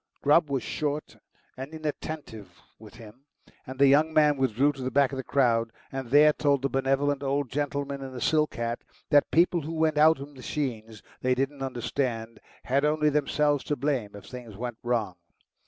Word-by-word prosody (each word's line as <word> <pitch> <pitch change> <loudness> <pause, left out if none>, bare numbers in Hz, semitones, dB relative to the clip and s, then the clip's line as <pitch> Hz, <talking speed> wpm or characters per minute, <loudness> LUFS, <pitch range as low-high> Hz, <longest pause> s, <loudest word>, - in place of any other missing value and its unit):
Grubb 150 +2 +4
wass 135 -3 -1
short 150 0 -3 0.4
and 135 +5 -8
inattentive 145 - -6 0.2
with 110 +1 -14
him, 115 +4 -14 0.4
and 130 +1 -7
the 140 - +5
young 150 +4 +4
man 150 -2 +4
withdrew 135 +1 +2
to 135 -2 -10
the 130 - -2
back 140 0 +2
of 135 - -5
the 130 - -4
crowd, 115 -4 +1 0.2
and 135 -2 -5
there 150 +3 +6
told 140 -3 +1
the 140 - +1
benevolent 135 +1 0
old 140 -2 -1
gentleman 140 0 -3
in 135 -1 -7
the 130 - -7
silk 155 +3 +1
hat 120 0 -2 0.3
that 145 -1 +5
people 170 +1 +3
who 160 +3 -6
went 160 -1 +1
out 160 +1 +6
with 140 +1 -8
machines 125 -6 -5 0.2
they 130 0 +2
didn't 135 +2 -2
understand 120 -3 -3 0.2
had 135 +3 +1
only 150 0 +2
themselves 145 0 +1
to 145 - -1
blame 130 -9 -2
if 100 - -11
things 120 -5 -10
went 120 0 -5
wrong. 115 -6 -1
135 Hz, 185 wpm, -27 LUFS, 125-145 Hz, 0.4 s, there